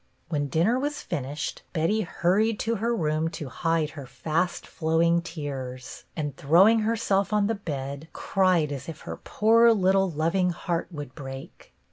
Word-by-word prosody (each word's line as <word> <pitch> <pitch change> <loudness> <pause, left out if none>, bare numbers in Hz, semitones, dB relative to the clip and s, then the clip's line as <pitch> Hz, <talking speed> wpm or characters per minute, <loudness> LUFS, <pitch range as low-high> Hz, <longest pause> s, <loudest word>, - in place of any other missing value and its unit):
When 145 -3 -1
dinner 180 - +2
was 295 +2 -3
finished 145 -2 -4
Betty 170 +6 +1
hurried 205 +4 +1
to 230 0 0
her 235 +3 0
room 155 -3 0
to 145 - -6
hide 165 +1 0
her 140 -4 -9
fast 165 +7 -2
flowing 170 +1 +2
tears, 135 -6 -6
and, 145 -4 -3
throwing 185 +12 +5
herself 215 -2 +1
on 210 -1 +3
the 225 - +1
bed, 140 -6 -5
cried 185 -6 +1
as 140 +2 -5
if 160 - -8
her - - -6
poor 230 +2 +4
little 195 -1 +3
loving 170 +4 +1
heart 170 -1 -2
would 145 -6 -7
break. 135 -2 -9
170 Hz, 155 wpm, -26 LUFS, 150-200 Hz, -, throwing